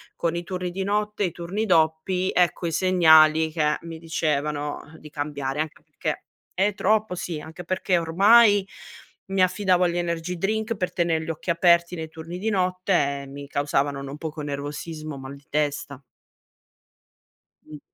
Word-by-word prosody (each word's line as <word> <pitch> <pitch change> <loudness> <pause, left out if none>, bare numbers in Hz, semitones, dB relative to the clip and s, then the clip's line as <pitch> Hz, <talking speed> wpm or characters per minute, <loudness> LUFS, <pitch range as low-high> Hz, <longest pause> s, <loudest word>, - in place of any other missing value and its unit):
con 170 0 -1
i 170 - -3
turni 180 0 -4
di 190 +2 -3
notte 210 +1 -1
e - - +3
i - - -5
turni 180 +7 -3
doppi 175 +1 +2
ecco, 180 0 +2
i - - -2
segnali 160 -3 +5
che 150 -2 +1
mi 165 -1 -7
dicevano, 150 -2 -1 0.2
uh, - - -12
di 150 - -12
cambiare. 145 -2 -3
Anche 155 -1 -6
perché - - -4 0.3
è 200 +3 +1
troppo 215 -1 +1
sì, 170 -3 -4
anche 160 +3 -9
perché 185 +1 0
ormai 200 +5 +5 0.6
mi 195 0 0
affidavo 185 0 +2
agli 175 0 0
energy 175 0 -2
drink 220 +5 -1
per 180 -2 -2
tener 170 -3 +1
gli 160 - -7
occhi 165 +3 -5
aperti 170 +1 +3
nei 160 -1 -6
turni 165 +2 -8
di 220 +4 -1
notte 180 -7 0
e - - -11
mi 140 +1 -9
causavano 140 0 0
non 140 +1 -7
poco 155 0 -6
nervosismo, 150 +1 -5
mal 135 +1 -8
di 140 0 -18
testa. 145 -2 -2 1.6
Un 150 -1 -10
165 Hz, 165 wpm, -24 LUFS, 150-185 Hz, 1.6 s, segnali